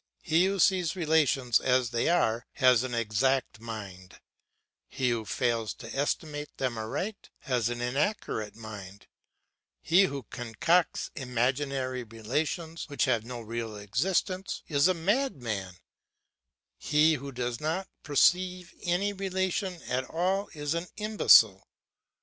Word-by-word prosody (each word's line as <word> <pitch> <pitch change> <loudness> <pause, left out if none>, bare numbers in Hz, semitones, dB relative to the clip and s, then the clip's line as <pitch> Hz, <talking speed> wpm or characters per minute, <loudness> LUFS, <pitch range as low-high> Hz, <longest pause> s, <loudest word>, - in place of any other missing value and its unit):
He 165 +2 +3
who 195 +1 -1
sees 180 -2 +3
relations 150 -8 +2
as 125 -2 +1
they 115 +4 +1
are 115 -9 +1
has 125 -4 +5
an 130 -2 -3
exact 115 +2 0
mind; 100 -5 -8 0.7
he 125 -2 0
who 115 -2 -2
fails 115 -1 -1
to 115 -1 -9
estimate 145 +1 -2
them 130 -3 -1
aright 180 - -4
has 125 -4 0
an 120 0 -4
inaccurate 125 - -1
mind; 105 -3 -10 0.7
he 180 +4 +4
who 140 -7 -4
concocts 155 +9 0
imaginary 130 0 -1
relations, 150 - -3
which 145 - +1
have 120 -5 +1
no 120 0 -7
real 115 -1 -5
existence, 185 - -1
is 145 +1 +3
a 185 - +2
madman; 135 - -1 1.0
he 155 +2 +4
who 140 -1 -5
does 125 -2 -3
not 165 +5 -2
perceive 180 +5 +2
any 185 +4 0
relation 190 -1 -2
at 130 +1 -2
all 190 +6 -1
is 145 0 -2
an 170 +2 -3
imbecile. 200 - +5
135 Hz, 125 wpm, -29 LUFS, 115-175 Hz, 1.0 s, has